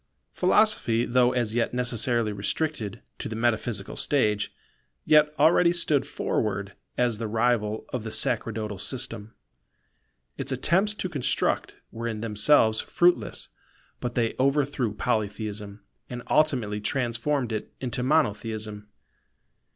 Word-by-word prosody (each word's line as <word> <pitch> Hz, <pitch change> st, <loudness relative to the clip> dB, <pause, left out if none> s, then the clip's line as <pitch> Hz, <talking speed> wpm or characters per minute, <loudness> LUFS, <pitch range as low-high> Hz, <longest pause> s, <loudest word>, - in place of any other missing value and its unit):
Philosophy, 180 Hz, -, +2 dB
though 125 Hz, 0 st, +3 dB
as 120 Hz, -4 st, -1 dB
yet 120 Hz, +1 st, 0 dB
necessarily 120 Hz, -2 st, 0 dB
restricted 110 Hz, +1 st, -2 dB, 0.2 s
to -, -, -4 dB
the 110 Hz, -, -5 dB
metaphysical 110 Hz, -2 st, -1 dB
stage, 105 Hz, -8 st, +1 dB, 0.5 s
yet 150 Hz, -1 st, +5 dB
already 170 Hz, +1 st, +5 dB
stood 155 Hz, -5 st, +1 dB
forward 100 Hz, -2 st, -2 dB, 0.2 s
as 120 Hz, -3 st, +1 dB
the 115 Hz, -, -2 dB
rival 110 Hz, -1 st, 0 dB
of 125 Hz, -4 st, -4 dB
the 110 Hz, -, -5 dB
sacerdotal 110 Hz, -5 st, 0 dB
system. 110 Hz, -3 st, -2 dB, 1.0 s
Its -, -, -3 dB
attempts 200 Hz, +5 st, +1 dB
to 190 Hz, -, -3 dB
construct 145 Hz, -8 st, -1 dB, 0.2 s
were 115 Hz, +1 st, -5 dB
in 110 Hz, -2 st, -4 dB
themselves 110 Hz, +1 st, +3 dB
fruitless; 175 Hz, 0 st, +1 dB, 0.5 s
but 120 Hz, 0 st, -4 dB
they 115 Hz, -2 st, +1 dB
overthrew 135 Hz, -3 st, +1 dB
Polytheism, 105 Hz, -2 st, -3 dB, 0.3 s
and 125 Hz, -1 st, -6 dB
ultimately 125 Hz, -9 st, +2 dB
transformed 125 Hz, +2 st, -1 dB
it 110 Hz, -, -4 dB
into 125 Hz, -1 st, -3 dB
Monotheism. 110 Hz, -6 st, -1 dB
120 Hz, 120 wpm, -26 LUFS, 110-135 Hz, 1.0 s, yet